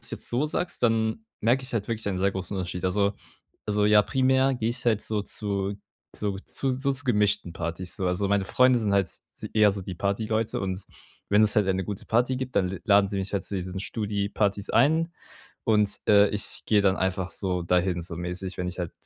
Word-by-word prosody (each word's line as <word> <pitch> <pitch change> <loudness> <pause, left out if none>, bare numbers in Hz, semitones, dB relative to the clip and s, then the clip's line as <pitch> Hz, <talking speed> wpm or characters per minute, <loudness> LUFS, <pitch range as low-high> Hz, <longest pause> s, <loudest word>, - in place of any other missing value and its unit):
es - - -4
jetzt - - -3
so 125 +5 +1
sagst, 175 +3 -3
dann 115 - +1 0.2
merke 120 +5 +2
ich 130 - -6
halt 105 -3 -2
wirklich 110 -2 -2
einen 95 -2 -2
sehr 100 +1 +2
großen 95 +1 -4
Unterschied. 90 0 -4
Also 100 +2 +2 0.5
also, 105 0 +2
ja, 105 0 +6
primär 130 +2 +2
gehe 115 -2 -1
ich 120 - -4
halt 110 -3 +2
so 105 -2 -1
zu 100 -1 -2 0.4
zu 100 -2 -2
zu 135 - -2
so 135 +2 0
zu 135 +1 -2
gemischten 105 -7 +1
Partys, 85 +2 -5
so. 95 - -2
Also, 90 +3 0
meine 100 -1 +2
Freunde 125 +4 +4
sind 105 -3 0
halt 100 -2 +3
s - - -12 0.3
eher 105 -2 +5
so 100 - -5
die 90 0 -6
Partyleute 110 +4 -1
und 95 0 -3 0.5
wenn 105 +1 +5
es 105 0 +2
halt 105 - +4
eine 95 0 +1
gute 100 0 -5
Party 125 +3 +2
gibt, 130 -1 -5
dann 90 -2 +2
l 95 -2 -6
laden 100 -1 +5
sie 100 - -3
mich 95 +1 -4
halt 100 - -1
zu 100 - -4
diesen 95 +1 -4
Studi-Partys 100 -1 -1
ein, 160 +7 +3 0.5
und, 105 -2 +3
äh, 100 -1 +7
ich 105 0 -2
gehe 105 -2 +4
dann 95 -1 +4
einfach 95 -1 -1
so 90 -3 -2
dahin, 90 0 +1
so 85 0 -7
mäßig, 90 +2 -5
wenn 90 0 -2
ich 90 - -7
halt, 90 -2 -3
100 Hz, 220 wpm, -26 LUFS, 95-110 Hz, 0.5 s, äh